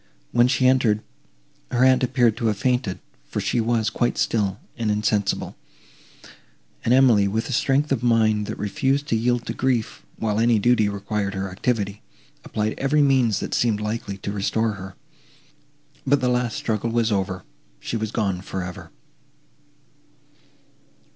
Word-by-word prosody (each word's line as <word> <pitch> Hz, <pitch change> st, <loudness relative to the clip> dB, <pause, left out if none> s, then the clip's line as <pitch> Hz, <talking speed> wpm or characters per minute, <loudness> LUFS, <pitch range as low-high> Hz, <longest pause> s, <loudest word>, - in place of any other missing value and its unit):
When 120 Hz, 0 st, +4 dB
she 125 Hz, 0 st, +1 dB
entered, 120 Hz, -5 st, +3 dB, 0.7 s
her 125 Hz, +1 st, +3 dB
aunt 130 Hz, 0 st, +5 dB
appeared 125 Hz, -3 st, +2 dB
to 120 Hz, -2 st, 0 dB
have 105 Hz, -2 st, 0 dB
fainted, 125 Hz, -4 st, 0 dB, 0.3 s
for -, -, -3 dB
she 120 Hz, -, 0 dB
was 110 Hz, -1 st, 0 dB
quite 120 Hz, +2 st, 0 dB
still, 100 Hz, -3 st, 0 dB, 0.2 s
and 115 Hz, -3 st, -2 dB
insensible; 105 Hz, -1 st, 0 dB, 1.3 s
and 115 Hz, -, 0 dB
Emily 125 Hz, -6 st, +5 dB
with 110 Hz, +3 st, -2 dB
a -, -, -2 dB
strength 140 Hz, +4 st, +1 dB
of 130 Hz, -4 st, +1 dB
mind, 110 Hz, -3 st, +2 dB
that -, -, -5 dB
refused 135 Hz, +8 st, 0 dB
to -, -, +2 dB
yield 120 Hz, +1 st, 0 dB
to -, -, -3 dB
grief, 125 Hz, -4 st, -1 dB
while 110 Hz, -1 st, -1 dB
any 115 Hz, 0 st, +4 dB
duty 110 Hz, -1 st, +3 dB
required 100 Hz, 0 st, -3 dB
her 95 Hz, 0 st, -3 dB
activity, 100 Hz, 0 st, -2 dB, 0.4 s
applied 110 Hz, 0 st, -2 dB
every 145 Hz, +2 st, +3 dB
means 125 Hz, -7 st, +2 dB
that -, -, -4 dB
seemed 115 Hz, -3 st, +1 dB
likely 105 Hz, -2 st, -4 dB
to 100 Hz, -, -5 dB
restore 110 Hz, +2 st, 0 dB
her. 95 Hz, -2 st, -9 dB, 1.1 s
But 140 Hz, +1 st, +4 dB
the 125 Hz, -1 st, +1 dB
last 125 Hz, -2 st, 0 dB
struggle 110 Hz, 0 st, -1 dB
was 115 Hz, -1 st, +1 dB
over—she 95 Hz, +2 st, -5 dB
was 110 Hz, -1 st, -2 dB
gone 95 Hz, -6 st, -1 dB
for 95 Hz, -1 st, -5 dB
ever. 90 Hz, 0 st, -8 dB
110 Hz, 155 wpm, -23 LUFS, 105-125 Hz, 1.3 s, aunt